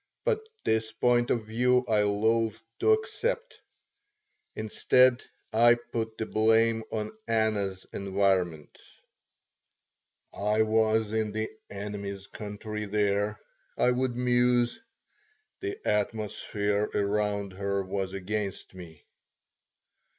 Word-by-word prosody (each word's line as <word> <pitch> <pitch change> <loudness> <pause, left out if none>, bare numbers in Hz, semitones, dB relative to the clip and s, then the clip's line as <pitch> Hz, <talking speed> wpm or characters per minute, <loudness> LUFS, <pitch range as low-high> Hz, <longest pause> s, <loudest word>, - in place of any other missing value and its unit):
But 450 -3 +1 0.2
this 110 0 +1
point 120 +1 +2
of 115 -3 0
view 125 +3 +2
I 110 -2 +3
loathed 110 +2 +1 0.2
to 440 - +4
accept. 450 +3 -2 0.9
Instead, 125 +3 +3 0.3
I 120 +2 +6
put 115 -2 -5
the 110 - -2
blame 110 +1 +3
on 110 - -3
Anna's 105 -4 0
environment. 95 -5 0 1.6
"I 105 +2 +2
was 110 0 +2
in 110 -1 0
the 110 0 -2 0.2
'enemy's 100 -1 -6
country' 105 +1 -6
there," 105 0 0 0.4
I 125 - +4
would 125 0 0
muse. 125 - +2 0.8
"The 395 +1 -4
atmosphere 105 -1 -1
around 100 -1 0
her 100 +1 -1
was 95 0 -3
against 100 +1 -4
me." 85 -4 -12
110 Hz, 100 wpm, -28 LUFS, 100-120 Hz, 1.6 s, I